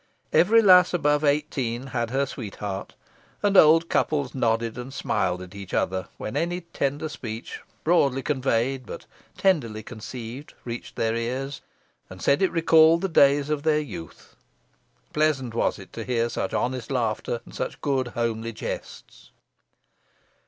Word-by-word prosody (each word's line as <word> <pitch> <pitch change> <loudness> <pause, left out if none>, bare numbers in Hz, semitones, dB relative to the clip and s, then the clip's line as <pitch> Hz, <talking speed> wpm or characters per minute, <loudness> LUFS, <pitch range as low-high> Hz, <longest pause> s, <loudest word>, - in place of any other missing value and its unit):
Every 225 +6 +5
lass 180 -2 +7
above 150 -3 +2
eighteen 140 -5 0
had 120 -2 -1
her 135 +3 +1
sweetheart, 105 -6 -6 0.5
and 200 -1 +2
old 165 -1 +7
couples 145 -7 0
nodded 115 -3 0
and 125 +2 -7
smiled 90 -8 -1
at 90 +1 -12
each 100 -2 -6
other 95 0 -1
when 105 - -5
any 175 +2 -1
tender 145 -2 -2
speech, 115 -6 -7 0.2
broadly 140 -6 +2
conveyed 130 -2 0
but - - -8 0.3
tenderly 120 - +1
conceived, 120 +3 -8
reached 120 -1 -6
their 115 0 0
ears, 130 +4 -3 0.5
and - - -11
said 140 - +2
it 190 - +3
recalled 165 0 +5
the 195 - -1
days 145 -2 +4
of 150 -2 0
their 155 0 +2
youth. 110 - -9 0.8
Pleasant 150 -6 +1
was 115 - 0
it 95 - -13
to 115 - -5
hear 120 0 0
such - - -3
honest 125 -2 -2
laughter, 120 -2 -1
and - - -14
such - - -4
good 135 -3 0
homely 115 -1 -2
jests. - - -7
130 Hz, 145 wpm, -25 LUFS, 115-150 Hz, 0.8 s, lass